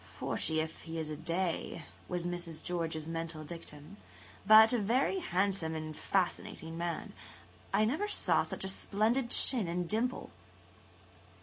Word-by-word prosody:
"Forty, 160 0 +1
if 160 0 -4
he 165 0 -6
is 155 -1 -3
a - - -3
day," 170 0 -3 0.2
was 180 -1 -3
Mrs. 175 -2 -4
George's 165 -3 -3
mental 165 -1 -4
dictum, 155 +2 -10 0.5
"but 220 +2 +9
a 245 - +2
very 250 - +1
handsome 185 - 0
and 155 -1 -5
fascinating 175 -3 -2
man. 170 0 -4 0.6
I 215 - +3
never 310 - 0
saw 420 - +2
such - - -3
a - - -2
splendid 220 +6 0
chin 240 -6 +5
and 175 +1 -2
dimple." 235 +6 -1
175 Hz, 140 wpm, -32 LUFS, 160-215 Hz, 0.6 s, but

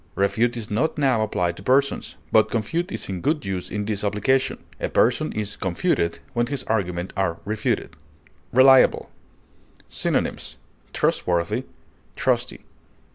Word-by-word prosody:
Refute 115 +5 +1
is 110 -2 -6
not 135 +10 0
now 130 -6 +2
applied 90 -5 0
to - - -11
persons, 135 +6 +1 0.2
but - - +5
confute 165 - -2
is - - -4
in 95 -3 -4
good 150 - 0
use 95 -2 -3
in 105 -1 -3
this 105 -1 -2
application; 105 +6 +1 0.2
a - - -2
person - - +2
is 105 -1 -3
confuted 85 -2 0 0.2
when 120 0 +1
his 140 0 -3
arguments 90 -5 -2
are 90 -4 0
refuted. 105 +1 -2 0.6
RELIABLE. 130 +1 +5 0.8
Synonyms: - - -2 0.3
trustworthy, 90 +8 0 0.5
trusty. - - 0
110 Hz, 130 wpm, -23 LUFS, 95-130 Hz, 0.8 s, but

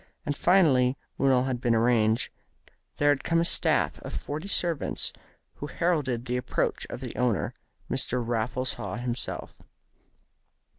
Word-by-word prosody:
And 145 - -1
finally, 140 -8 +4 0.2
when 135 0 +3
all 125 -1 +4
had 130 -2 -2
been 120 -2 +2
arranged, 115 -1 +2 0.7
there 145 - +3
had 145 -2 +2
come 165 0 +2
a 170 - +2
staff - - +2
of - - -7
forty 155 +6 -5
servants, 170 -6 0 0.4
who 145 - -5
heralded 145 -9 0
the 125 0 -1
approach 125 0 -1
of - - -6
the 125 -3 -5
owner, 120 -5 0 0.3
Mr. 125 - +2
Raffles 120 +3 -1
Haw - - -5
himself. 120 0 -4
130 Hz, 145 wpm, -27 LUFS, 120-145 Hz, 0.7 s, finally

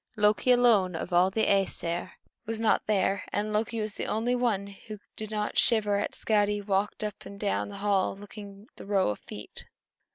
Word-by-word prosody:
Loki 210 +3 +2
alone, 225 -8 +4
of 175 +2 -5
all 180 +2 +5
the 220 +3 +1
Æsir, 185 -3 0 0.3
was 225 0 -2
not 225 -1 +2
there; 200 -2 +1
and 210 +1 -1
Loki 225 +2 -1
was 215 -1 -4
the - - -3
only 225 +3 0
one 235 -6 +1
who 200 +2 -10 0.2
did 215 -1 -6
not 210 -1 -1
shiver 210 -3 +3
as - - -3
Skadi 205 -1 +1
walked 200 +1 -1
up 210 -2 -5
and 200 - -10
down 205 0 -1
the 200 - -8
hall 195 -1 +1
looking 205 0 -11
at - - -39
the - - -10
row 195 - +2
of 105 - -6
feet. 105 - -10
205 Hz, 195 wpm, -28 LUFS, 195-215 Hz, 0.3 s, all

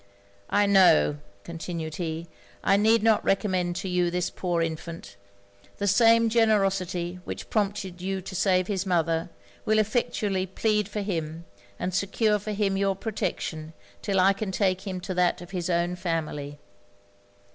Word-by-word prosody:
'I 205 0 +3
know,' 175 - +5 0.3
continued 165 -2 -5
he, 165 -1 -3 0.4
'I 195 - +4
need 220 +1 +4
not 225 -1 +4
recommend 185 -3 0
to 190 - -4
you 180 -1 +1
this 180 0 -1
poor 175 -2 -2
infant: 165 -5 -6 0.6
the 200 - -2
same 230 +3 +5
generosity 195 -6 +1
which - - -7
prompted 200 -4 -1
you 190 +1 -2
to 190 +1 -8
save 185 0 +2
his 195 -2 -2
mother, 165 -2 +1 0.3
will 215 0 +2
effectually 210 -3 0
plead 210 +2 0
for 210 0 -3
him, 165 -4 -4 0.3
and 180 - -3
secure 210 +3 +1
for 215 +2 -5
him 200 -2 0
your 195 0 +1
protection 165 -6 -4 0.3
'till 195 -2 0
I 195 +2 +5
can 195 0 -4
take 190 0 0
him 185 -1 -3
to 185 - -4
that 180 -1 +2
of 175 +1 -11
his 180 -2 -3
own 175 0 +1
family. 155 -5 -3
185 Hz, 155 wpm, -26 LUFS, 175-205 Hz, 0.6 s, know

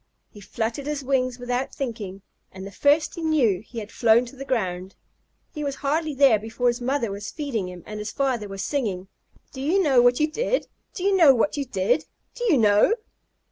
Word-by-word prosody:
He 205 - -13
fluttered 225 +7 -4
his 295 -2 -3
wings 255 -2 0
without 245 +1 -3
thinking, 210 -7 -5 0.3
and 190 0 -9
the 200 - -8
first 290 +9 +2
he 340 - -7
knew 280 - +2
he 230 +2 -13
had 215 -1 -6
flown 235 +1 +4
to 245 - -12
the 270 - -7
ground. 190 -8 -2 0.6
He 300 -3 -5
was 280 -1 -2
hardly 305 +1 0
there 265 -6 +5
before 225 +3 -1
his 240 +1 -3
mother 250 -3 -1
was 200 +1 -6
feeding 245 - -3
him 180 -2 -10
and 210 0 -7
his 210 0 -5
father 255 -6 -1
was 195 0 -5
singing: 195 -8 -2 0.4
"Do 265 - -7
you 325 +8 +2
know 275 -9 +4
what 245 0 +4
you 305 - +4
did? - - -1 0.3
Do 365 - -5
you 395 0 +3
know 315 -8 +7
what 245 +5 +1
you 285 -1 -2
did? 240 +5 0 0.3
Do 485 - -6
you 360 - +4
know?" 210 - +4
245 Hz, 210 wpm, -24 LUFS, 210-285 Hz, 0.6 s, know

